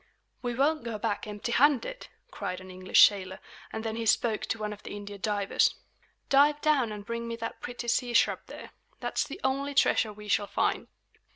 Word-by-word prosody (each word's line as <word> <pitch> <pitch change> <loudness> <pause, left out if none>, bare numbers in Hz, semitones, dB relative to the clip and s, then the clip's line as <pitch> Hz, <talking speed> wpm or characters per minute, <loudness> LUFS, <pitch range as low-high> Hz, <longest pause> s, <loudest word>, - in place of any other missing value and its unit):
"We 245 -1 -2
won't 300 +3 +2
go 230 -2 -4
back 215 -1 -2
empty 210 +3 -4
handed," 290 - +2 0.2
cried 180 0 -4
an 185 0 -11
English 185 0 +6
sailor; 190 -2 -6 0.3
and 220 - -5
then 225 0 -3
he 230 -1 -2
spoke 220 0 +2
to - - -1
one 210 -1 -3
of 205 - -12
the, - - -7
Indian 205 -1 -8
divers. 205 -2 +1 0.5
"Dive 290 +2 +5
down 285 -7 +2
and 205 -1 -7
bring 235 0 -4
me 230 - -3
that 230 0 -6
pretty 245 -1 -6
sea 240 0 +1
shrub - - +4
there. - - -10 0.3
That's - - -1
the 290 - -8
only 275 +2 -1
treasure 220 -5 +3
we 210 0 -11
shall 205 0 +1
find!" - - 0
230 Hz, 195 wpm, -29 LUFS, 205-265 Hz, 0.5 s, English